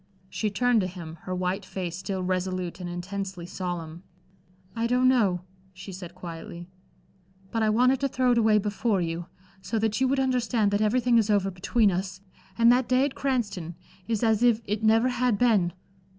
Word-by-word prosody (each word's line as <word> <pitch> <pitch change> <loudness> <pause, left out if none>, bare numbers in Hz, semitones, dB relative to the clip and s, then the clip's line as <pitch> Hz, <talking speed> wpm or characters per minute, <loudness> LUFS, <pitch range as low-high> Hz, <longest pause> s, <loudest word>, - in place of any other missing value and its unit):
She 215 - -1
turned 235 +2 +2
to 185 - -1
him, 170 -3 -9
her 185 - -2
white 185 +2 -2
face 185 -2 -5
still 190 0 -4
resolute 185 -1 -2
and 180 -1 -5
intensely 185 0 -5
solemn. 175 -2 -5 0.7
"I 230 0 0
don't 250 +1 +3
know," 205 -9 +3 0.3
she 190 +1 -9
said, 175 -2 -9
quietly, 170 -1 -8 0.9
"but 225 - -1
I 215 - +3
wanted 250 +4 +3
to 275 - +1
throw 255 -1 +1
it 240 - +3
away 220 -1 +4
before 210 0 0
you, 170 0 -3 0.3
so 225 +4 -3
that 220 +2 0
you 260 - +4
would 270 +1 +1
understand 245 -5 +1
that 205 +1 +1
everything 235 +2 +3
is 220 -1 0
over 200 -2 +2
between 200 +4 +2
us, 185 +1 -3 0.4
and 235 0 +6
that 250 0 +2
day 255 +2 +4
at 285 - -3
Cranston 205 -11 -2 0.3
is 225 -1 -1
as 220 -1 +3
if 240 -2 +4
it 210 +2 -2
never 225 +3 +4
had 245 -3 +1
been. 205 -7 +3
205 Hz, 185 wpm, -26 LUFS, 185-235 Hz, 0.9 s, and